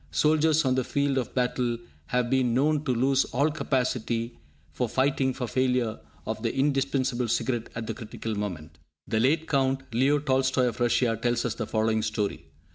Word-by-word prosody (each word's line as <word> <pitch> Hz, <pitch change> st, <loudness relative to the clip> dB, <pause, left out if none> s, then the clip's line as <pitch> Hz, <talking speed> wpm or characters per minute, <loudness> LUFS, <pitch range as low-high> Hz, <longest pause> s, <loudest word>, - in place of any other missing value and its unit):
Soldiers 155 Hz, 0 st, +3 dB
on 130 Hz, -, +3 dB
the 130 Hz, 0 st, +1 dB
field 140 Hz, +1 st, 0 dB
of 125 Hz, -, -5 dB
battle 125 Hz, -1 st, 0 dB, 0.3 s
have 125 Hz, +3 st, +1 dB
been 130 Hz, -3 st, +2 dB
known 150 Hz, +3 st, +2 dB
to 130 Hz, -, +1 dB
lose 130 Hz, +3 st, +3 dB
all 140 Hz, +5 st, +1 dB
capacity 125 Hz, -5 st, -1 dB, 0.3 s
for 125 Hz, -2 st, -2 dB
fighting 135 Hz, +1 st, +1 dB
for 125 Hz, -1 st, -4 dB
failure 125 Hz, -2 st, 0 dB, 0.3 s
of 110 Hz, 0 st, -4 dB
the 115 Hz, -1 st, 0 dB
indispensable 135 Hz, -3 st, +1 dB
cigarette 120 Hz, 0 st, -1 dB
at 115 Hz, -1 st, -4 dB
the 115 Hz, -, -3 dB
critical 110 Hz, 0 st, -6 dB
moment. 90 Hz, -9 st, -5 dB, 0.3 s
The 110 Hz, -, 0 dB
late 150 Hz, +7 st, +2 dB
Count 135 Hz, -2 st, +1 dB
Leo 135 Hz, +5 st, +3 dB
Tolstoi 130 Hz, -3 st, +2 dB
of 120 Hz, -, -8 dB
Russia 120 Hz, -1 st, +2 dB
tells 120 Hz, -1 st, +1 dB
us -, -, 0 dB
the 110 Hz, -, -4 dB
following 110 Hz, 0 st, +1 dB
story. 105 Hz, -2 st, -2 dB
125 Hz, 175 wpm, -27 LUFS, 115-135 Hz, 0.3 s, Soldiers